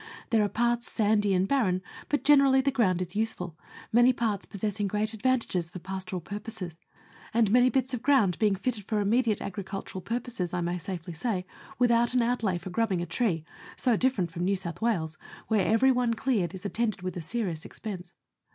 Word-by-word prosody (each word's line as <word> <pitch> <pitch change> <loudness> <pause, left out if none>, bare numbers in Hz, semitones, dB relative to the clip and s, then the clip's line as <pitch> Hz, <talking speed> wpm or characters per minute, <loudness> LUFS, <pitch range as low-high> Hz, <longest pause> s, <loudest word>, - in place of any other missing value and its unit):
There 220 -2 +4
are 205 - +1
parts 240 +2 0
sandy 210 -2 +2
and 185 +1 +2
barren, 190 -9 +1 0.3
but 290 - 0
generally 275 -2 +6
the 275 +1 +2
ground 185 -9 +2
is 180 +2 -8
useful, 205 -6 -2 0.4
many 240 +2 +6
parts 220 -5 -1
possessing 205 +1 -2
great 210 +2 0
advan 255 +3 +1
tages 175 -6 -2
for 180 - -8
pastoral 185 0 -5
purposes, 205 -2 -5 0.6
and 225 -4 +4
many 245 +2 +6
bits 260 0 0
of 245 - -2
ground 240 -11 +3
being 210 -3 +3
fitted 210 +1 -3
for 215 0 0
immediate 220 +1 +2
agricultural 195 -1 -5
purposes, 230 -5 -3
I 180 - -1
may 175 +1 -1
safely 180 -1 -5
say, 185 +1 -2 0.3
without 240 0 +3
an 250 - +4
outlay 230 -6 0
for 175 +2 -7
grubbing 190 -3 0
a - - -3
tree 175 -8 -1 0.3
so 245 -3 +2
different 210 -8 +1
from 170 +1 -4
New 195 +2 +2
South 180 -1 -6
Wales, 165 -9 0 0.3
where 215 -4 +2
every 225 +5 +5
one 245 -2 +1
cleared 220 -7 0
is 190 - -10
attended 215 -2 -1
with 185 -1 -3
a 175 - -4
serious 175 -3 -2
expense. 185 -5 -7
210 Hz, 190 wpm, -28 LUFS, 180-240 Hz, 0.6 s, generally